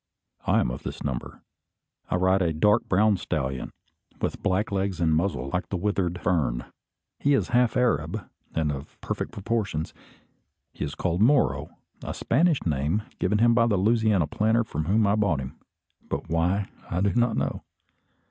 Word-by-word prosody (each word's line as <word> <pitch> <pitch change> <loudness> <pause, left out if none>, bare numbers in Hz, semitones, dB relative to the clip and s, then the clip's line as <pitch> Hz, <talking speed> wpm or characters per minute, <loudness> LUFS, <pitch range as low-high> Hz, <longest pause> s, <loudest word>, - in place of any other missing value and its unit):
I - - +4
am - - 0
of 60 - -6
this - - -6
number. 65 -4 -5 0.7
I - - +1
ride 95 +1 +3
a 85 -3 +1
dark 105 +8 +3
brown 105 +2 +4
stallion, 70 -7 -3 0.5
with - - -2
black 100 +2 0
legs, 95 -2 -1
and 80 -2 +3
muzzle 80 -6 -1
like 90 -1 -1
the 95 - -1
withered 90 -2 -1
fern. 75 -10 0 0.5
He 145 0 +3
is - - 0
half 120 0 +3
Arab, 125 -2 0 0.3
and 80 -2 +1
of 70 0 -8
perfect - - -3
proportions. 100 -6 -2 0.8
He - - -5
is 75 0 -4
called 85 +1 -1
Moro, 135 +5 +3 0.3
a - - -4
Spanish 160 +4 +2
name 80 +7 0 0.2
given 105 +3 +1
him 115 +2 +5
by 115 0 +4
the 105 -4 +2
Louisiana 110 -3 +3
planter 110 +9 +1
from 80 -8 -4
whom 105 +5 +3
I 100 - +3
bought 100 -8 +1
him, 65 -1 -7 0.5
but - - -3
why 90 +5 +1 0.2
I 90 +1 -1
do 100 -1 +2
not 120 -2 +2
know. - - -1
95 Hz, 170 wpm, -26 LUFS, 80-110 Hz, 0.8 s, him